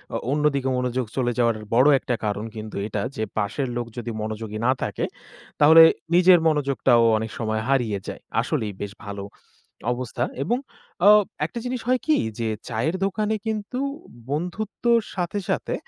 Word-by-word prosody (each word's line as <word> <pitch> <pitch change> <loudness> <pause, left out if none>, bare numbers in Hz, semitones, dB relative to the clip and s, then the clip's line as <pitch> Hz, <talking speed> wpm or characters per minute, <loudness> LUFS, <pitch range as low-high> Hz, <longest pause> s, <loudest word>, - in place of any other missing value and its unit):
অ - - +1
অন্যদিকে 140 -3 +1
মনোযোগ 125 0 -1
চলে 120 -2 +1
যাওয়ার 115 -2 +3 0.2
বড় 130 +5 +5
একটা 125 - -2
কারণ 105 +1 -2
কিন্তু 110 0 -7
এটা 105 -1 -3
যে, 110 - -2
পাশের 110 +6 -1
লোক 120 - -2
যদি 120 0 -4
মনোযোগী 110 0 -4
না 130 - +5
থাকে - - -2 0.5
তাহলে 160 +2 +9 0.3
নিজের 180 0 +7
মনোযোগটাও 135 -5 +3
অনেক 110 0 -4
সময় 110 -1 -1
হারিয়ে 120 -7 +1
যায়। - - -6 0.2
আসলেই 105 -2 -2
বেশ 100 -1 -4
ভালো 100 -1 -6 0.7
অবস্থা। 125 -1 -3 0.2
এবং 240 - +1 0.5
আও 210 0 +9 0.3
একটা 235 - -5
জিনিস 250 -1 -3
হয় 255 0 +3
কি 310 - +3 0.2
যে, 115 - -1 0.2
চায়ের 125 +10 -1
দোকানে 215 +2 0
কিন্তু 220 +3 -3 0.5
বন্ধুত্বর 205 +9 0 0.2
সাথে, 180 +2 -2
সাথে - - -1
130 Hz, 155 wpm, -24 LUFS, 110-180 Hz, 0.7 s, তাহলে